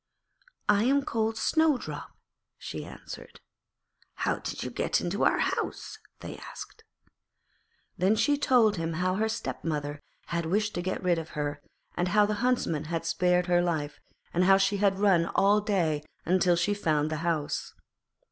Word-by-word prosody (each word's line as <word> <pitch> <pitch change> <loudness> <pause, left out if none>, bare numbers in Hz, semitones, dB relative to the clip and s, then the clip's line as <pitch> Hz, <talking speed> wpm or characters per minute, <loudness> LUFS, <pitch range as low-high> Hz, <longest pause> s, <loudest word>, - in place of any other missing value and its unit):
'I 205 0 +4
am 280 +2 +3
called 220 0 -1
Snowdrop,' 315 -5 0 0.4
she - - -6
answered. - - -10 0.8
'How - - -1
did - - -5
you - - -4
get - - 0
into - - -2
our - - +3
house?' - - -2 0.2
they - - -7
asked. 450 - -10 1.2
Then 190 +5 +3
she 230 +7 +3
told 240 -7 +3
them 165 0 -2
how 185 +3 0
her 220 +1 +1
stepmother 150 -8 -3 0.2
had 170 -1 -2
wished 210 +4 0
to 175 - -2
get 185 +2 -3
rid 175 -2 +2
of 160 - -7
her, 145 0 -2 0.3
how 190 +4 +3
the 210 - -1
Huntsman 240 - 0
had 165 +1 -3
spared 180 0 +2
her 175 -1 +3
life, 150 -4 -2 0.3
and 180 +2 +3
how 195 +1 +7
she 195 +1 +2
had 195 -1 +2
run 190 -5 +3
all 205 +2 +4
day 175 -8 0 0.4
till 175 -1 +4
she 180 +4 +1
had 205 - -8
found 155 -1 +1
the 155 - -1
house. 160 -2 -2
180 Hz, 160 wpm, -28 LUFS, 165-210 Hz, 1.2 s, how